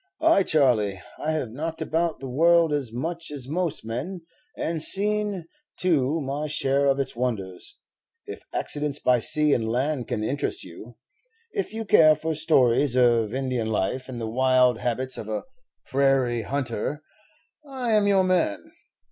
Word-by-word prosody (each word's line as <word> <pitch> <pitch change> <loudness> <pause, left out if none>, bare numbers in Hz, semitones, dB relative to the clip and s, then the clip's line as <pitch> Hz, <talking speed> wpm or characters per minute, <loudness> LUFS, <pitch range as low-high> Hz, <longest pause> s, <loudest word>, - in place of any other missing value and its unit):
"Ay, 320 -10 +4
Charley, 120 - +2 0.2
I 155 +1 0
have 140 -8 -3
knocked 160 +6 -5
about 165 +1 -1
the 135 - -7
world 165 +4 +3
as 140 -6 -2
much 165 +7 -4
as 140 -4 -6
most 160 -3 -2
men, 135 +12 -5 0.4
and 165 -1 -2
seen, 205 0 +3 0.3
too, 160 -4 +1
my 145 +1 -3
share 140 -1 +1
of 135 0 +2
its 135 - -3
wonders. 105 -7 -4 0.5
If - - -8
accidents 145 -1 0
by 125 -3 +2
sea 150 +5 +3
and 110 -1 0
land 130 +1 -1
can 105 - -3
interest 140 +6 -2
you, 105 +7 -12 0.6
if 400 -2 -3
you 225 0 -5
care 155 -6 +6
for 160 +2 -3
stories 140 -4 +3
of 120 -4 +3
Indian 130 -4 -2
life 110 +5 -2
and 125 -2 -6
the 115 - -4
wild 125 +1 +2
habits 130 +2 -2
of 110 - -7
a 110 - -3 0.4
prairie 130 -3 +1
hunter, 135 +3 -3 0.6
I 260 -5 -3
'm 210 -1 +3
your 195 -2 +4
man. 180 - 0
140 Hz, 155 wpm, -24 LUFS, 120-160 Hz, 0.6 s, care